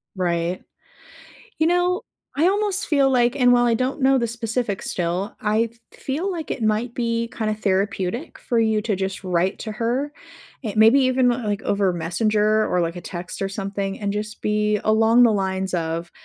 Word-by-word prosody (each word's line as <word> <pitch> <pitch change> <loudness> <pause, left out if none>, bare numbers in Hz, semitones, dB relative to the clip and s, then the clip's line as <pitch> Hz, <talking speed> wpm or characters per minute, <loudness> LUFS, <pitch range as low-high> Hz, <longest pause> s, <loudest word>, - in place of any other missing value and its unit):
Right. 175 -1 -1 1.0
You 315 - +3
know, 355 +3 +2 0.4
I 325 - +4
almost 405 0 0
feel 280 -3 +3
like 245 -1 +2
and 250 -3 +5
while 245 0 +4
I 235 -1 +3
don't 255 +4 -2
know 270 +1 +4
the 235 -2 0
specifics 225 -2 -3
still, 180 +5 -2
I 220 +1 +1 0.2
feel 310 +9 -3
like 335 -4 -5
it 235 - -3
might 220 +3 0
be 230 -1 -1
kinda 215 -1 -1
therapeutic 200 - -1
for 235 - 0
you 220 -1 +2
to 210 -2 -1
just 190 +1 -4
write 180 +1 0
to 220 - -5
her. 240 +6 -1 0.5
It 220 -3 -4
maybe 225 +6 +6
even 255 -1 +3
like 220 -5 -1
over 200 -2 +1
messenger 210 +5 +1
or 180 - +1
like 170 0 -2
a - - -7
text 175 +1 -7
or 195 - 0
something 195 0 -4
and 200 -1 -2
just 210 +1 -5
be 210 0 +1
along 225 +2 +4
the 235 - +5
lines 190 -2 -1
of, 165 0 -2
215 Hz, 180 wpm, -22 LUFS, 195-245 Hz, 1.0 s, maybe